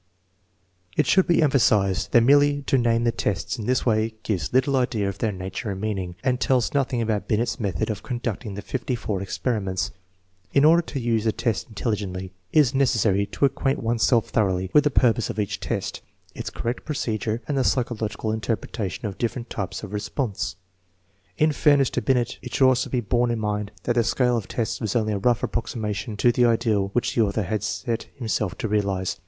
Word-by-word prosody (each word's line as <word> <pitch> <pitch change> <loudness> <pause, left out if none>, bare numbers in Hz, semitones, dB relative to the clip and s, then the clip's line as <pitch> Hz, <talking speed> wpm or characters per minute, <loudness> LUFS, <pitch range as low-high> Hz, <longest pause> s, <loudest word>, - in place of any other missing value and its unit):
It - - +4
should 190 -1 +4
be 170 -2 +4
emphasized 105 -9 +2
that 120 - +6
merely 145 +2 +4
to 135 - +1
name 115 -1 +2
the 120 - +3
tests 105 -2 -2
in 105 - -5
this 130 0 +1
way 110 -1 +1
gives 90 -9 -2
little 130 +2 +2
idea 120 -6 +1
of 100 0 -4
their 110 -1 0
nature 95 +4 -5
and 95 -1 -4
meaning, 95 -4 -3
and 125 -1 +1
tells 130 -3 +1
nothing 130 -4 +1
about 110 -2 -1
Binet's 115 +4 0
method 100 -1 -1
of 105 0 -5
conducting 120 -4 -4
the 100 - -6
54 110 -2 -3
experiments. 95 -3 -2 0.6
In 140 +1 +5
order 165 +2 +6
to 150 -4 -5
use 115 -2 0
the 110 - +3
tests 110 -1 -2
intelligently 100 -4 -3 0.2
it - - +4
is 135 -2 +1
necessary 110 -7 +2
to - - +1
acquaint 135 0 0
one's 115 0 0
self 115 -1 +3
thoroughly 95 -3 0
with 150 0 +5
the - - +5
pur 125 -4 +4
pose 115 - -3
of - - -5
each 100 -2 -2
test, - - -3 0.3
its - - -5
correct 120 +2 -4
procedure, 115 -5 -2
and 145 - -1
the 135 - +2
psychologi 120 -4 -1
cal 110 - -1
interpretation 110 -1 -3
of 100 -3 -5
different 120 0 -3
types 95 -2 -4
of 105 -1 -7
response. 105 -2 -3 0.8
1 155 - +4
In - - +1
fairness 145 -2 +3
to - - -1
Binet, 125 -3 0
it - - -6
should 130 - +5
also 130 -1 +2
be 125 - 0
borne 120 +2 +1
in 120 - 0
mind 105 -1 -2
that 120 - +1
the 120 -1 +3
scale 125 +1 +2
of 115 -4 -3
tests 115 +1 -2
was 110 -2 -2
only 110 -2 +1
a 100 - -1
rough 120 +3 +2
approximation 110 -1 -3
to 120 - +4
the 120 +1 +3
ideal 115 -4 +2
which 120 - 0
the 115 - +2
author 105 0 +1
had 105 +2 -2
set 115 +2 -3
himself 110 -7 -2
to 125 - -2
realize. 100 -5 -1
115 Hz, 205 wpm, -24 LUFS, 105-125 Hz, 0.8 s, that